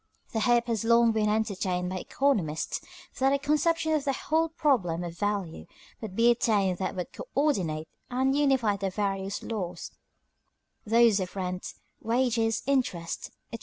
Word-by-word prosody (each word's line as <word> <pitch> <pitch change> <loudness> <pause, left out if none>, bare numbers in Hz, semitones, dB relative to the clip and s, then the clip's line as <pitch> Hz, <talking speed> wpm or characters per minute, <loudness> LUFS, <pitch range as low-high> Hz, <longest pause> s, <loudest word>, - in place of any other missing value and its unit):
The 220 - 0
hope 240 +1 +3
has 230 -3 -1
long 235 0 +5
been 215 -1 +1
entertained 190 -4 -1
by 185 - -3
economists 190 - -1 0.4
that 270 +1 +3
a - - +3
conception 305 +3 +1
of 305 -2 +1
the 275 -1 0
whole 320 +5 0
problem 215 - +1
of 170 -1 -6
value 200 -3 -3 0.3
would 210 -4 -6
be 235 +2 +5
attained 205 -6 +1
that 190 - -2
would 180 -1 -5
coördinate 185 - -1 0.2
and 260 +2 +1
unify 265 -8 +2
the 195 0 -2
various 195 0 -2
"laws," 180 -6 -5 1.0
those 230 -2 +5
of 185 0 -4
rent, 185 -1 -4 0.3
wages, 230 -1 +1
interest, 245 -12 -1 0.2
etc. 230 - -4
220 Hz, 150 wpm, -28 LUFS, 185-260 Hz, 1.0 s, long